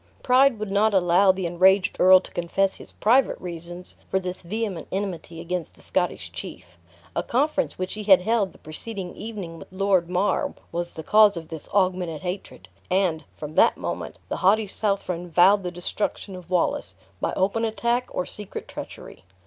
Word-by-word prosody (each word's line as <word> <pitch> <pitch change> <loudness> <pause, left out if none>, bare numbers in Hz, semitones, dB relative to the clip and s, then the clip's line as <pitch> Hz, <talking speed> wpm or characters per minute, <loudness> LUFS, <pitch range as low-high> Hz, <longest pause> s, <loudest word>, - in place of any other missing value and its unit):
Pride 260 0 +5
would 210 -2 -5
not 205 +1 +3
allow 185 +1 +5
the 190 -1 -4
enraged 190 +3 +3
earl 185 +1 +8
to - - -11
confess 190 +3 0
his - - -11
private 250 +5 +2
reasons 175 0 -6
for - - +1
this 180 -1 -5
vehement 205 0 -4
enmity 185 -4 -4
against 175 -1 -4
the - - -16
Scottish - - -1
chief. 90 -1 -9 0.4
A - - +1
conference 285 +3 0
which 185 0 -3
he 215 - -5
had 190 -3 +7
held 220 -3 +1
the - - -18
preceding 185 +4 -6
evening 200 -7 -7
with - - -11
Lord 190 -2 +1
Mar, 185 +2 0 0.2
was 175 +1 -4
the 160 - -6
cause 210 +1 +5
of 160 -1 -7
this 160 -2 -8
augmented 180 -5 0
hatred; 185 +2 -6 0.2
and, 180 -5 +1
from 150 0 -7
that - - +4
moment, - - -5
the - - -3
haughty 210 +4 +3
Southron 190 -4 -2
vowed 190 +5 +5
the 180 - -3
destruction 180 +2 -4
of 180 -1 -11
Wallace, 235 +11 0 0.2
by - - -1
open 200 +4 0
attack, 235 +2 0
or 180 - -2
secret 210 -2 -7
treachery. - - -9
185 Hz, 175 wpm, -24 LUFS, 175-205 Hz, 0.4 s, earl